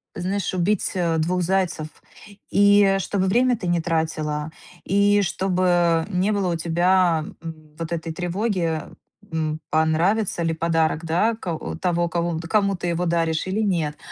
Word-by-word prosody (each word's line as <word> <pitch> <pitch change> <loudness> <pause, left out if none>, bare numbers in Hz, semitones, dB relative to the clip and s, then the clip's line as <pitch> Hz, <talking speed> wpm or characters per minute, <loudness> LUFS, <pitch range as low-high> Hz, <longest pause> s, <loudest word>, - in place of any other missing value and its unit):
Знаешь, 185 +2 -2
убить, 185 +3 0
а, 170 -3 +1
двух 180 +3 0
зайцев, 180 -3 0 0.6
и, 205 0 +5
э, 195 0 +3
чтобы 195 0 -1
время 245 +3 +3
ты 185 - -7
не 175 -1 +1
тратила, 155 -2 -2 0.3
и 200 +1 +3
чтобы 175 -3 +1
не 190 +2 +1
было 190 -4 0
у - - -2
тебя, 170 0 +2 0.2
м, 155 -2 -9
вот 165 0 -5
этой 165 -1 -3
тревоги, 175 -2 -1 0.5
м, 155 -1 -2
понравится 170 +5 +1
ли 165 0 0
подарок, 165 0 0
да, 180 +8 +2
ко 175 -7 -4 0.2
того 175 -1 +1
кого 170 -1 -1
кому 200 -2 +2
ты 175 0 -6
его 170 +1 -1
даришь, 165 0 0
или 205 +4 -1
нет. 165 -7 -1
175 Hz, 155 wpm, -23 LUFS, 160-195 Hz, 0.6 s, и